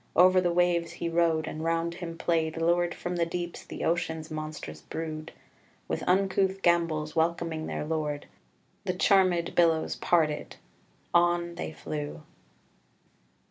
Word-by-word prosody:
Over 185 +1 +6
the 175 -1 +1
waves 170 -1 +2
he 170 0 -3
rode, 165 -2 +2
and 155 - -5
round 165 +1 0
him 170 -1 -6
played, 165 -1 0
Lured 175 +1 +2
from 175 0 -4
the 170 - +2
deeps, 175 0 -4
the - - -7
ocean's 160 -1 -1
monstrous 155 - -6
brood, 155 - -5 0.6
With - - -2
uncouth 190 +1 +2
gambols 165 -3 +2
welcoming 165 -1 0
their - - -3
lord: 150 -2 -2 0.6
The 185 -2 -1
charmèd 185 -3 +3
billows 165 -2 +3
parted: 155 -4 +1 0.6
on 175 0 +3
they 170 - -5
flew." 150 0 -5
170 Hz, 135 wpm, -28 LUFS, 160-175 Hz, 0.6 s, Over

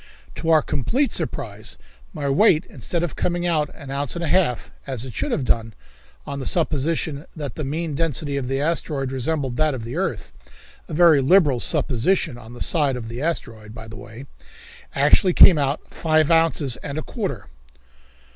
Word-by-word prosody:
To 165 - -4
our 155 -2 +5
complete 250 - 0
surprise, - - -2 0.3
my 150 -6 -4
weight, 155 +3 +4
instead 165 +7 -3
of 175 - -3
coming 175 0 -1
out 155 -4 +1
an 140 -3 -9
ounce 140 +2 -1
and 170 - -3
a - - -1
half, 150 -8 +1 0.2
as 130 -3 -3
it 130 - -8
should - - -2
have 135 - -1
done, 115 -3 0 0.5
on 140 - -5
the 130 - -4
supposition 155 -1 -1
that 145 -5 -5
the 155 - -5
mean 155 +3 -3
density 150 -1 -1
of 135 -3 -2
the 135 +1 -1
asteroid 145 -3 -1
resembled 135 -1 -2
that 155 -3 +2
of 120 - -6
the 115 - -6
earth - - -3 0.5
a - - -5
very 165 -4 +6
liberal 145 -3 +4
supposition 130 +6 +1
on 120 0 -12
the 120 - -11
side 145 -5 +2
of 115 -2 -6
the 120 +3 -6
asteroid, 115 -9 -4
by 110 -1 -9
the 110 - -10
way 115 +4 -10 0.7
actually 185 -4 +4
came 170 -3 +8
out 140 +1 -2
five 155 -1 +2
ounces 165 -5 +2
and 140 0 -6
a 155 - -3
quarter! 190 - -4
145 Hz, 185 wpm, -22 LUFS, 130-165 Hz, 0.7 s, came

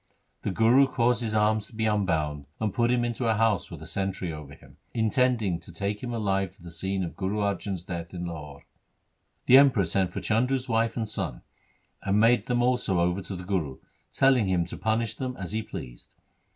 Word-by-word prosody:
The - - -2
Guru 115 +7 +5
caused 120 -2 +1
his 110 -2 -2
arms 105 0 +2
to 115 - -16
be 110 0 0
unbound, 80 -9 0
and 110 -3 -1
put 120 0 +2
him 120 -1 +2
into 120 0 -2
a 110 - +3
house 110 -4 +1
with - - -9
a - - -8
sentry 95 -3 -3
over 75 -2 -9
him, - - -19 0.2
intending 110 -5 +2
to 85 - -12
take 100 +4 -3
him 125 - -4
alive 95 -5 -1
to 95 - -20
the 85 - -9
scene 95 +3 -2
of 85 - -5
Guru 100 +2 -2
Arjan's 100 -3 -2
death 85 -3 -6
in 90 -1 -5
Lahore. 75 -4 -8 0.8
The 130 - +8
Emperor 130 -9 +4
sent 95 -1 +1
for - - -5
Chandu' 125 +5 +1
s 130 0 -4
wife 115 0 +1
and 115 -2 -1
son, 100 - -4 0.6
and 100 +1 +1
made 115 +2 +4
them 120 0 +1
also 125 -7 +1
over 90 +2 +1
to 95 - -6
the 90 - -7
Guru, 85 -8 -2 0.3
telling 130 -6 +4
him 90 -2 +1
to 85 - -7
punish 110 0 0
them 125 +2 -5
as 95 -2 -5
he 110 +1 -1
pleased. 65 - -9
105 Hz, 210 wpm, -27 LUFS, 90-115 Hz, 0.8 s, The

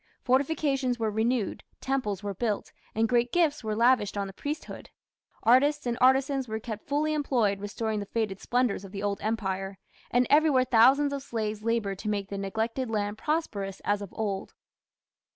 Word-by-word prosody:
Fortifications 270 -1 +1
were 220 -2 -1
renewed, 220 0 0 0.2
temples 215 -8 -2
were 200 -1 -3
built, 210 +1 -2 0.2
and 225 +1 +2
great 240 +1 +2
gifts 315 -6 +2
were 215 -1 -2
lavished 230 -3 +3
on 200 - -1
the 195 - -8
priesthood. 300 +8 -6 0.5
Artists 285 +5 +4
and 240 -1 0
artisans 265 +1 +3
were 220 0 -3
kept 220 -1 -7
fully 300 +2 +1
employed 240 -9 +1
restoring 215 +1 -3
the 200 - -5
faded 210 -3 -2
splendours 245 -5 0
of 195 0 -11
the 200 0 -5
Old 200 -1 -1
Empire, 195 -3 -2 0.3
and 245 +1 +3
everywhere 290 -4 +4
thousands 265 +5 +5
of 280 - -3
slaves 215 -5 -3
laboured 220 -4 -1
to 210 - -3
make 200 -1 -2
the 200 - -4
neglected 225 +5 -2
land 205 -1 -2
prosperous 205 - -2
as 205 0 +1
of 200 - -7
old. 200 -3 -3
225 Hz, 170 wpm, -28 LUFS, 205-265 Hz, 0.5 s, thousands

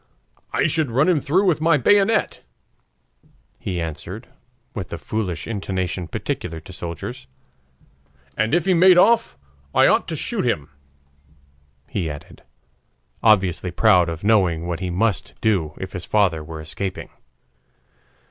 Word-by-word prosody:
"I - - +1
should 155 -2 +1
run 130 +7 +2
him 175 -4 +3
through 175 +9 +1
with 170 -5 +2
my 165 -1 +4
bayonet," 205 - +2 1.2
he 90 -2 -3
answered 85 +7 -6 0.5
with 95 -5 -5
the - - -5
foolish 100 -6 -3
intonation 95 -4 -3
peculiar 80 0 -4
to 90 +4 -13
soldiers; 85 -6 -6 1.1
"and 110 +7 +1
if 175 - +1
he 190 - +3
made 180 +1 +6
off, 225 - +4 0.4
I - - +6
ought - - +3
to - - -3
shoot - - -2
him," 75 0 -1 1.2
he 90 -6 -3
added, 75 -1 -10 0.8
obviously 95 -5 +3
proud 90 -2 +4
of 80 +1 -6
knowing 95 -6 +2
what 85 -1 -3
he 90 -1 -3
must 100 +2 -1
do 90 -9 0
if 95 0 -6
his 90 -2 -5
father 95 -7 +1
were 80 0 -8
escaping. 95 +5 -5
95 Hz, 140 wpm, -22 LUFS, 85-130 Hz, 1.2 s, made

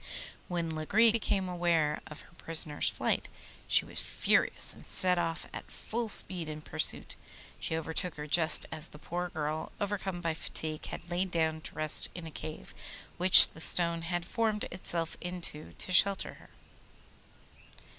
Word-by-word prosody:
When 170 -2 -3
Lagree 195 +9 +3
became 200 -4 -1
aware 170 -4 0
of 150 - -11
her - - -20
prisoner's 160 -3 +1
flight - - -2 0.4
she - - +2
was - - +3
furious, - - +1
and - - -15
set 180 -1 +3
off 165 -1 -3
at - - -9
full 230 0 -5
speed 180 -5 +1
in 155 0 -7
pursuit. - - +4 0.4
She 160 - -2
overtook 160 +2 -4
her 150 - -7
just 155 +1 +4
as 160 0 -2
the - - -14
poor 175 +3 -5
girl, 155 0 -5
overcome 195 -3 -4
by 165 -2 -2
fatigue, 155 -1 -4
had 170 +1 -9
lain 185 +2 -1
down 160 -2 -1
to - - -12
rest 155 -1 +4
in 175 -2 -8
a 160 - -9
cave 155 +1 -8 0.4
which 185 +1 +8
the 160 - -11
stone 170 0 +3
had 175 +1 -4
formed 220 +1 -1
itself 170 -2 -4
into 175 -3 -3
to - - -6
shelter 195 +1 +4
her. - - -18
170 Hz, 160 wpm, -30 LUFS, 155-180 Hz, 0.4 s, which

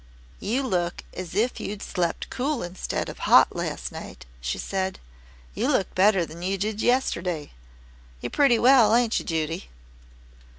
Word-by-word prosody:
"You 250 +6 -1
look 175 -8 -1
as 180 -1 -7
if 230 +5 +1
you'd 205 0 -5
slept 175 -3 -2
cool 270 -1 -1
instead 175 +1 -3
of - - -8
hot - - +7
last - - -3
night," 65 - -9 0.2
she 60 +2 -2
said. 190 -1 -2 0.6
"You - - -1
look 190 - 0
better 190 -2 +4
than 165 +2 -11
you 190 +2 -1
did 215 +2 -2
yesterday. 180 - 0 0.7
You're - - -5
pretty 275 -5 +4
well, 235 -3 +6
ain't 235 -2 +2
you, - - -8
Judy?" 165 +2 -2
195 Hz, 155 wpm, -25 LUFS, 175-235 Hz, 0.7 s, hot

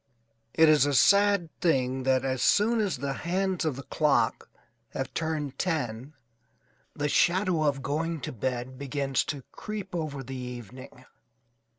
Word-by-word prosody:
It 160 - +6
is 150 -2 +5
a 145 - 0
sad 200 - +4
thing 130 -5 +1
that 130 0 +2
as 130 -1 -1
soon 225 +3 +3
as 200 -9 0
the 135 +1 -3
hands 185 +2 -1
of 155 -5 0
the 135 - -8
clock 150 +1 +1 0.4
have - - -4
turned 155 -4 -3
ten 145 -5 -2 0.8
the 145 - -1
shadow 180 +2 +2
of 140 -3 0
going 160 +4 -2
to - - -4
bed 125 +2 -4
begins 140 -1 -1
to 140 -4 -5
creep 210 -3 -7
over 155 -5 -3
the 135 - -8
evening. 125 0 -9
145 Hz, 150 wpm, -28 LUFS, 130-170 Hz, 0.8 s, It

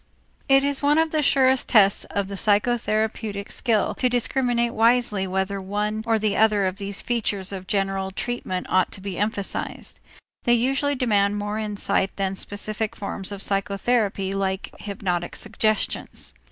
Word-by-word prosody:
It 270 0 +6
is 280 -1 +1
one 290 +1 +3
of 320 0 +2
the 310 - +1
surest 265 -2 +3
tests 200 -3 +5
of 200 -1 -2
psychotherapeutic 215 0 0
skill 225 -5 +1
to 250 - +3
discriminate 245 -1 0
wisely 225 -4 +2
whether 190 +1 -1
one 210 +3 -2
or 225 -1 +3
the 215 -1 0
other 215 -2 +3
of 185 0 -2
these 200 0 -4
features 205 -5 -1
of 190 -1 -7
general 195 -1 -1
treatment 190 -3 -3
ought 185 -1 +2
to - - -7
be 190 -1 -5
emphasized. 205 -1 -2 0.4
They 240 - +3
usually 270 +4 +1
demand 205 -5 +2
more 205 +1 -3
insight 205 -2 -1
than 195 -1 -1
specific 210 +2 -3
forms 200 -1 -3
of 200 -1 -3
psychotherapy 195 0 0
like 190 0 -2
hypnotic 185 -4 -3
suggestions. 215 0 -2
210 Hz, 150 wpm, -24 LUFS, 195-235 Hz, 0.4 s, It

